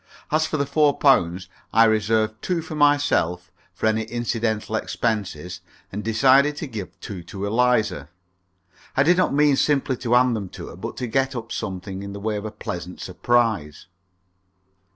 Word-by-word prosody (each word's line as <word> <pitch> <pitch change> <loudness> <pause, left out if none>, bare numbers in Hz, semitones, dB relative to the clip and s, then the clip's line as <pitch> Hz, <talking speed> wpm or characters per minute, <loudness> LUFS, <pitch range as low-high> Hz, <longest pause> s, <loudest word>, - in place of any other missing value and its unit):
As 155 +1 +2
for 155 - -2
the 140 - 0
four 145 0 +2
pounds, 90 - +3 0.2
I 115 - +6
reserved 110 0 +1
two 175 -3 -1
for 160 - -8
myself, 145 - +2 0.2
for 90 - -5
any 110 0 +1
incidental 115 -2 -2
expenses, 95 -7 -3 0.3
and 105 +2 -5
decided 135 +6 +4
to - - -4
give 100 - -8
two 95 -4 -7
to 100 +2 -5
Eliza. 110 - +1 0.9
I 135 - +5
did 175 +4 +4
not 185 - +2
mean 145 0 +4
simply 140 -3 +1
to 120 0 -2
hand 125 -1 +4
them 100 -4 -5
to - - -7
her, - - -10
but - - -7
to 125 - -2
get 130 +3 0
up 115 -1 -6
something 95 -1 -5
in 100 0 -7
the 100 - -7
way 105 +1 -2
of 105 0 -4
a 110 - -4
pleasant 90 -4 -6
surprise. 100 -7 0
110 Hz, 175 wpm, -23 LUFS, 100-135 Hz, 0.9 s, I